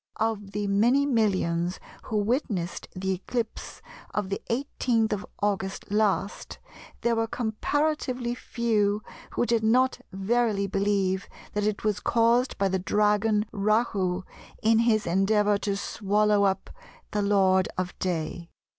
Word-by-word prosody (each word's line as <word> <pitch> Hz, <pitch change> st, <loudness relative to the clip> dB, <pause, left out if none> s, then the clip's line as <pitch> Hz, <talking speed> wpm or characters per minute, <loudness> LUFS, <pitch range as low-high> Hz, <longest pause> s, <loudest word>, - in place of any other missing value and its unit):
Of 215 Hz, -3 st, -1 dB
the 210 Hz, 0 st, -1 dB
many 235 Hz, +8 st, +3 dB
millions 185 Hz, -8 st, +1 dB, 0.3 s
who 220 Hz, -, -2 dB
witnessed 205 Hz, -, -1 dB
the 190 Hz, +1 st, -2 dB
eclipse 225 Hz, +5 st, -4 dB, 0.3 s
of 205 Hz, -3 st, -1 dB
the 200 Hz, -, -3 dB
18th 235 Hz, -3 st, 0 dB
of 205 Hz, 0 st, -4 dB, 0.2 s
August 195 Hz, -1 st, -2 dB
last 205 Hz, -1 st, 0 dB, 0.4 s
there 235 Hz, 0 st, +2 dB
were 225 Hz, 0 st, 0 dB
comparatively 250 Hz, +2 st, -1 dB
few 215 Hz, -4 st, 0 dB, 0.3 s
who -, -, +1 dB
did 235 Hz, -1 st, +2 dB
not 255 Hz, +4 st, +3 dB
verily 205 Hz, +1 st, +1 dB
believe 195 Hz, -1 st, 0 dB, 0.2 s
that 210 Hz, 0 st, 0 dB
it 210 Hz, -1 st, -2 dB
was 210 Hz, -1 st, +1 dB
caused 235 Hz, +3 st, +2 dB
by 195 Hz, -, +2 dB
the 190 Hz, 0 st, 0 dB
dragon 210 Hz, +2 st, +2 dB
Rahu 200 Hz, -3 st, +1 dB, 0.4 s
in 225 Hz, +1 st, +4 dB
his 230 Hz, -2 st, +3 dB
endeavour 205 Hz, +3 st, +2 dB
to 200 Hz, -1 st, -1 dB
swallow 205 Hz, +1 st, +2 dB
up 190 Hz, -1 st, -1 dB, 0.4 s
the 210 Hz, -, 0 dB
Lord 190 Hz, -2 st, +3 dB
of 185 Hz, -1 st, -2 dB
Day.... 170 Hz, -1 st, -3 dB
210 Hz, 130 wpm, -27 LUFS, 195-230 Hz, 0.4 s, in